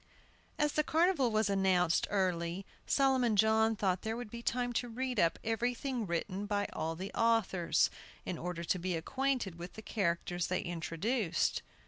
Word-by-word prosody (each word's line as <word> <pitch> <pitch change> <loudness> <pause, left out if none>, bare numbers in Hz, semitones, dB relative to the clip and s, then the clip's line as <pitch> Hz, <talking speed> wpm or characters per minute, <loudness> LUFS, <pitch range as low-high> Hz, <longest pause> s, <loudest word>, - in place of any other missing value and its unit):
As 295 0 +2
the 305 - +1
carnival 320 -5 +3
was 215 -1 +2
announced 190 -3 +2
early 180 -1 -1 0.2
Solomon 260 -5 +3
John 220 +2 +4
thought 190 -3 0
there 220 +1 -3
would 240 -3 -7
be 235 - -6
time 245 +1 -1
to 245 +1 -1
read 250 0 -2
up 165 -2 +3
everything 240 +1 -1
written 185 +4 -2
by 205 -1 0
all 160 +1 -2
the 190 +4 -6
authors, 225 -7 +2 0.3
in 175 - -4
order 175 0 -4
to 180 +2 0
be 180 0 -1
acquainted 255 -1 -1
with 175 +1 -7
the 220 - -10
characters 175 -4 -1
they 185 - 0
introduced. 175 +4 -1
205 Hz, 160 wpm, -33 LUFS, 180-240 Hz, 0.3 s, John